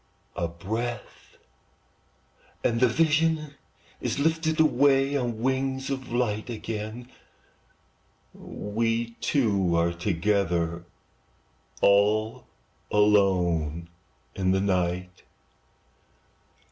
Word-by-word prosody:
A 85 - -1
breath, 110 +8 -6 1.3
and 115 0 +1
the 125 - +5
vision 155 +2 +1 0.5
is - - -2
lifted 160 +2 0
Away 140 -2 +3
on 120 -4 -1
wings 130 +1 -1
of 130 -2 -5
light, 120 -2 -1
And 115 - -4
again 110 +3 -6 1.3
we 115 +2 -2
two 100 - +1
are 85 +1 +2
together, 85 -2 0 1.0
All 105 +2 +3 0.4
alone 90 -6 +2 0.4
in 95 -1 -1
the 95 - +2
night. 90 -2 -1
110 Hz, 85 wpm, -26 LUFS, 90-130 Hz, 1.3 s, the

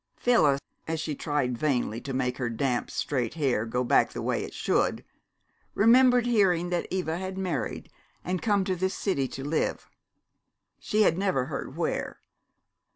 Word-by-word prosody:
Phyllis, 150 - +3 0.3
as 160 0 -2
she 155 -1 -3
tried 140 -5 -1
vainly 125 -6 0
to 140 - -6
make 125 -1 -1
her 125 -2 -1
damp, 120 +2 -1
straight 130 -2 -2
hair 130 -8 0
go 125 +2 -1
back 120 - +3
the - - -4
way - - 0
it - - -7
should, - - 0 0.7
remembered 245 +3 +5
hearing 185 -7 +2
that 175 - -1
Eva 175 -3 -2
had 190 0 -5
married 175 -9 -3 0.4
and 180 0 -2
come 205 -3 +2
to 185 -1 -1
this 190 +2 -1
city 140 -10 0
to 135 - -7
live. 150 +3 -1 0.9
She 215 +1 +2
had 170 -3 +2
never 185 -10 +1
heard - - -6
where. - - -2
160 Hz, 160 wpm, -27 LUFS, 130-190 Hz, 0.9 s, remembered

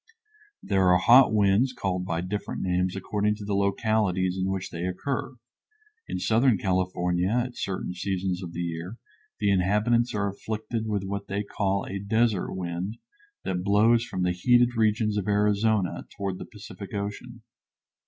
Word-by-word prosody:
There 95 -2 +2
are 90 - +6
hot 120 +7 +6
winds 105 +5 +3
called 90 -5 -2
by 85 -1 -1
different 100 +3 -4
names 90 0 0
according 105 +2 0
to 105 -1 -8
the 100 - -2
localities 100 -2 +1
in 95 0 -1
which 95 -1 -3
they 85 +1 -4
occur. 130 +7 -3 0.7
In - - -3
southern 115 0 +3
California 90 -1 0
at 120 +2 -1
certain 95 -2 -3
seasons 95 0 -2
of 90 -3 -6
the 85 - -4
year 85 +5 -5 0.4
the 100 -1 +2
inhabitants 105 +6 +2
are 100 -1 0
afflicted 110 +3 -4
with 105 -2 -1
what 100 +1 -4
they 100 +1 -2
call 100 -1 -1
a 100 - -4
desert 110 0 +1
wind 90 +4 -4 0.5
that 90 -1 -2
blows 110 +4 +4
from 95 -6 -3
the 90 - +2
heated 120 +6 +3
regions 110 -1 +1
of 100 - -5
Arizona 105 -1 +1
toward 95 -2 -3
the - - -6
Pacific 105 -3 -10
Ocean. 105 +4 -5
100 Hz, 160 wpm, -26 LUFS, 95-110 Hz, 0.7 s, are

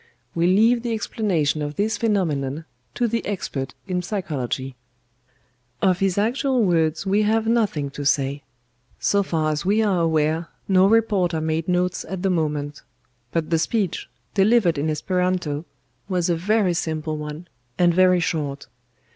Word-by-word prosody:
We 170 +1 +2
leave 225 +6 +4
the 235 -1 -2
explanation 175 -9 0
of 145 0 -4
this 215 +2 0
phenomenon 160 - -1 0.3
to 240 - +1
the 230 +1 -1
expert 145 -9 -4
in 180 -2 -1
psychology. 140 - -3 1.0
"Of 185 -2 +2
his 195 -1 +1
actual 250 +4 +1
words 165 -3 +1
we 200 +2 +2
have 220 +1 +2
nothing 210 -12 0
to 145 - -6
say. 140 0 +1 0.6
So 200 - +2
far 160 -5 0
as 150 0 -2
we 210 +4 +2
are 190 -5 +2
aware 160 0 +1 0.2
no 190 0 +5
reporter 200 -6 +2
made 160 +1 -1
notes 180 0 0
at 190 -1 -4
the 195 - +2
moment; 150 -4 -2 0.5
but 165 0 -2
the 165 - +3
speech, 200 +2 -1 0.2
delivered 195 -6 +3
in 155 +2 0
Esperanto, 175 -2 -1 0.4
was 180 -2 +1
a - - +2
very 195 +2 +1
simple 155 -2 -2
one, 150 +3 -7 0.3
and 175 -1 +4
very 185 0 +4
short. 150 -5 -2
175 Hz, 150 wpm, -23 LUFS, 155-200 Hz, 1.0 s, no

